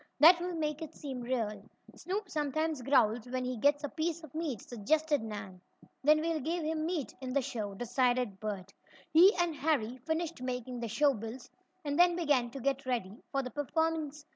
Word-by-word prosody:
That 340 Hz, +4 st, +8 dB
will 355 Hz, 0 st, -3 dB
make 300 Hz, -1 st, -2 dB
it 320 Hz, -1 st, -7 dB
seem 270 Hz, -4 st, -6 dB
real." 230 Hz, -5 st, -2 dB, 0.3 s
"Snoop 395 Hz, +3 st, -3 dB
sometimes 310 Hz, -1 st, -1 dB
growls 245 Hz, -3 st, +3 dB
when 255 Hz, 0 st, -2 dB
he 255 Hz, 0 st, -2 dB
gets 285 Hz, +5 st, +2 dB
a -, -, 0 dB
piece 325 Hz, +2 st, -2 dB
of 310 Hz, -, -11 dB
meat," 310 Hz, -8 st, -2 dB
suggested 290 Hz, +7 st, 0 dB
Nan. 205 Hz, -4 st, -7 dB, 0.4 s
"Then 305 Hz, +2 st, +5 dB
we'll 325 Hz, 0 st, 0 dB
give 325 Hz, +4 st, -2 dB
him 315 Hz, 0 st, -1 dB
meat 315 Hz, -, -2 dB
in 255 Hz, -1 st, -4 dB
the 280 Hz, -, +3 dB
show," 210 Hz, -5 st, -4 dB
decided 245 Hz, -2 st, 0 dB
Bert. 195 Hz, -3 st, -5 dB, 0.4 s
He 355 Hz, +5 st, +9 dB
and 345 Hz, -3 st, +1 dB
Harry 260 Hz, -6 st, 0 dB
finished 320 Hz, +2 st, -2 dB
making 250 Hz, -1 st, -4 dB
the 235 Hz, -, -3 dB
show 280 Hz, +6 st, +3 dB
bills, 225 Hz, +2 st, -7 dB, 0.3 s
and 290 Hz, +2 st, -1 dB
then 350 Hz, 0 st, +6 dB
began 290 Hz, -8 st, +2 dB
to 270 Hz, -, -7 dB
get 275 Hz, +1 st, -1 dB
ready 230 Hz, -4 st, -2 dB
for 275 Hz, -1 st, 0 dB
the 255 Hz, -, -6 dB
performance. 305 Hz, +1 st, -1 dB
275 Hz, 190 wpm, -32 LUFS, 240-315 Hz, 0.4 s, He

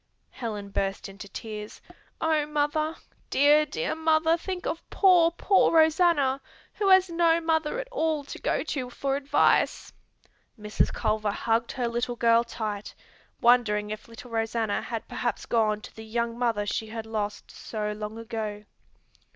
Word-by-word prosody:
Helen 210 Hz, -5 st, -5 dB
burst 195 Hz, 0 st, -2 dB
into 200 Hz, +1 st, -10 dB
tears. 210 Hz, +1 st, -7 dB, 0.4 s
"Oh, 310 Hz, -2 st, +1 dB
mother, 300 Hz, +1 st, 0 dB, 0.3 s
dear, 295 Hz, +2 st, +5 dB
dear 475 Hz, -, -2 dB
mother, 320 Hz, 0 st, +3 dB
think 360 Hz, +1 st, -5 dB
of 335 Hz, -, -2 dB
poor, 360 Hz, -4 st, +5 dB
poor 380 Hz, +3 st, +3 dB
Rosanna 315 Hz, -4 st, +3 dB, 0.3 s
who 405 Hz, -, -1 dB
has 375 Hz, -1 st, +6 dB
no 335 Hz, 0 st, +3 dB
mother 320 Hz, +5 st, 0 dB
at -, -, -5 dB
all 315 Hz, -6 st, 0 dB
to 280 Hz, -, -9 dB
go -, -, 0 dB
to 265 Hz, -5 st, -3 dB
for 270 Hz, +2 st, -2 dB
advice!" 280 Hz, 0 st, +2 dB, 0.7 s
Mrs. 210 Hz, 0 st, 0 dB
Culver 215 Hz, -1 st, 0 dB
hugged 225 Hz, +3 st, 0 dB
her 250 Hz, -3 st, -1 dB
little 240 Hz, +1 st, -2 dB
girl 230 Hz, 0 st, +4 dB
tight, 215 Hz, -3 st, -5 dB, 0.5 s
wondering 215 Hz, -4 st, +3 dB
if 215 Hz, +1 st, -7 dB
little 230 Hz, +1 st, -12 dB
Rosanna 225 Hz, -1 st, -1 dB
had 230 Hz, -2 st, -5 dB
perhaps 240 Hz, -3 st, -3 dB
gone 215 Hz, -2 st, +1 dB
to -, -, -12 dB
the 220 Hz, -, -9 dB
young 230 Hz, +1 st, -2 dB
mother 230 Hz, -4 st, 0 dB
she 220 Hz, +2 st, -2 dB
had 225 Hz, 0 st, -6 dB
lost 210 Hz, -2 st, -4 dB
so 210 Hz, -1 st, -4 dB
long 210 Hz, +1 st, -6 dB
ago. 220 Hz, -2 st, -5 dB
235 Hz, 150 wpm, -27 LUFS, 215-315 Hz, 0.7 s, has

